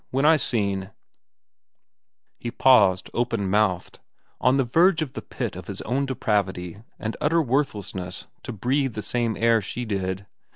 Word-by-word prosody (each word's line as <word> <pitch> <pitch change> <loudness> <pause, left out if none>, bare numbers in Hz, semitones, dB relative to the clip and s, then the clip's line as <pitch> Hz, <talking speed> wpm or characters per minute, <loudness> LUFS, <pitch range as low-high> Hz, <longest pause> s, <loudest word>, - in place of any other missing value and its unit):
When 135 +3 0
I 160 +1 +7
seen—" 100 -9 0 1.5
He 120 - -4
paused, 105 -7 +4
open 115 -4 -1
mouthed, 95 -4 +1 0.4
on 130 +2 +3
the 135 - +3
verge 165 +6 +3
of 135 - -8
the - - -5
pit - - -5
of - - -9
his - - -6
own 135 +4 -1
depravity 100 -6 -1 0.2
and 110 -1 -4
utter 165 +3 +3
worthlessness 105 - -2 0.2
to - - -6
breathe 130 +4 0
the 105 - -4
same 120 -2 -1
air 115 -1 +4
she 120 +5 -5
did. 95 -2 -3
115 Hz, 155 wpm, -24 LUFS, 100-130 Hz, 1.5 s, I